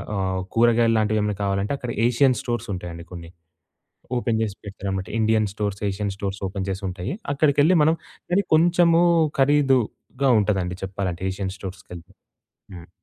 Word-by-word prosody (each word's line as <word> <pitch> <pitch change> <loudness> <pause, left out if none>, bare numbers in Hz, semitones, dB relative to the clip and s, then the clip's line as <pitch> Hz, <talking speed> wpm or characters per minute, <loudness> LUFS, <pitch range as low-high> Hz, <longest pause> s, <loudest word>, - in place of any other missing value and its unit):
ఆహ్, 95 -1 -1
కూరగాయల్లాంటివేమైనా 110 -3 +2
కావాలంటే 100 +3 -1
అక్కడ 125 -3 -5 0.2
ఏషియన్ 125 0 +3
స్టోర్స్ 120 -2 -3
ఉంటాయండి 85 -2 -7
కొన్ని. 85 -2 -9 0.9
ఓపెన్ 115 -2 0
జేసి 105 -3 -3
పెడతారన్నమాట. 95 -1 -4
Indian 110 -1 +2
stores, 100 -1 -3
Asian 100 0 -3
stores 100 0 -4
open 95 0 -4
చేసుంటాయి. 95 - -4 0.2
అక్కడికెళ్ళి 145 +4 +3
మనం 160 +2 +3 0.3
కానీ, 195 +3 +2
కొంచెము 170 +1 +4 0.4
ఖరీదుగా 135 -1 +2
ఉంటుందండి 95 -3 -1
చెప్పాలంటే 95 -2 -4
ఏషియన్ 95 0 -4
స్టోర్స్‌కెళ్తే. 90 -3 -10 0.6
హ్మ్. 85 -1 -11
105 Hz, 125 wpm, -23 LUFS, 95-125 Hz, 0.9 s, కొంచెము